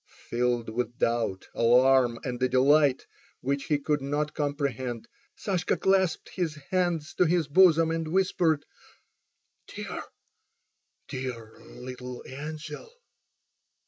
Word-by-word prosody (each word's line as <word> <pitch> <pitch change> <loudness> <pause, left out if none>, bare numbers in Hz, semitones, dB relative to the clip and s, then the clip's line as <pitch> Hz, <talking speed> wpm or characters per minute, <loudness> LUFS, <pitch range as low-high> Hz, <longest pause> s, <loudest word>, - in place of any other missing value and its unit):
Filled 120 -1 0
with 120 +1 -3
doubt, 115 -5 0
alarm, 125 0 +4
and 125 -1 -4
a 130 - +2
delight 140 +1 +4 0.4
which 140 +1 -1
he 150 - +2
could 145 0 -1
not 145 +2 -2
comprehend, 140 -5 -2 0.3
Sashka 190 -5 -1
clasped 190 -3 +1
his 170 -5 -2 0.2
hands 175 -4 0
to 180 - +6
his 170 -2 +1
bosom 165 0 +5
and 165 -1 -2
whispered: 165 -4 +1 1.0
"Dear—dear 125 -4 -9
little 125 0 -9
angel!" 150 - -7
140 Hz, 105 wpm, -27 LUFS, 125-160 Hz, 1.0 s, to